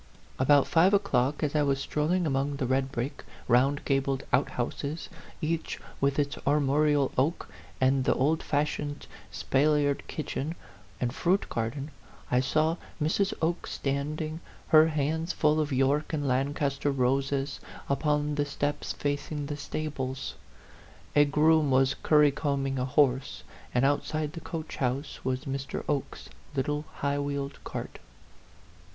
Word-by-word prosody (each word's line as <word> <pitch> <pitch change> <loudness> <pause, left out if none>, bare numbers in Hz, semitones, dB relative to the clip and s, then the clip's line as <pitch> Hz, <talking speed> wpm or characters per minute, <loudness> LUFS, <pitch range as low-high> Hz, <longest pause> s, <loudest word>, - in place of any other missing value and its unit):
About 140 +2 +5
five 180 +4 +4
o'clock, 150 -8 +1
as 150 0 0
I 150 - +4
was 140 -2 +1
strolling 155 +6 0
among 140 0 0
the 135 -2 -2
red 130 +1 0
brick, 135 +2 -4 0.2
round 135 +4 +3
gabled 135 -1 0
outhouses 140 +4 -1 0.3
each 165 +1 -2 0.2
with 140 0 +2
its 145 -1 0
armorial 145 0 +3
oak 155 +6 0 0.3
and 130 0 +3
the - - +2
old 155 +5 +2
fashioned 145 0 -2 0.3
spal 150 +3 +2
liered 145 -1 0
kitchen 155 +1 -4 0.4
and 120 -1 -1
fruit 185 +7 +1
garden, 130 +6 -3 0.4
I 125 - +4
saw 155 +5 +1 0.2
Mrs. 175 +6 +1
Oke 170 +2 0
standing, 155 +3 -2 0.3
her 155 -1 +7
hands 160 +2 -1
full 155 0 +2
of 150 -1 -1
York 135 +4 +1
and 145 -2 -1
Lancaster 140 +2 0
roses, 135 +1 0 0.3
upon 150 +1 +1
the 145 0 0
steps 145 0 -2
facing 145 +1 -3
the 145 +1 -4
stables. 140 -3 -4 0.8
A 145 0 +7
groom 150 +1 +4
was 135 0 +4
currycombing 140 -3 +2
a 125 - 0
horse, 130 - +1 0.3
and 125 +2 +2
outside 150 +2 0
the - - -6
coach 160 -2 -6
house 135 +3 -2
was 130 +2 -2
Mr. 135 0 -4
Oke's 145 -3 -3 0.3
little 145 +3 -1
high 140 -1 -1
wheeled 140 -1 -3
cart. - - -6
145 Hz, 135 wpm, -28 LUFS, 135-150 Hz, 0.8 s, her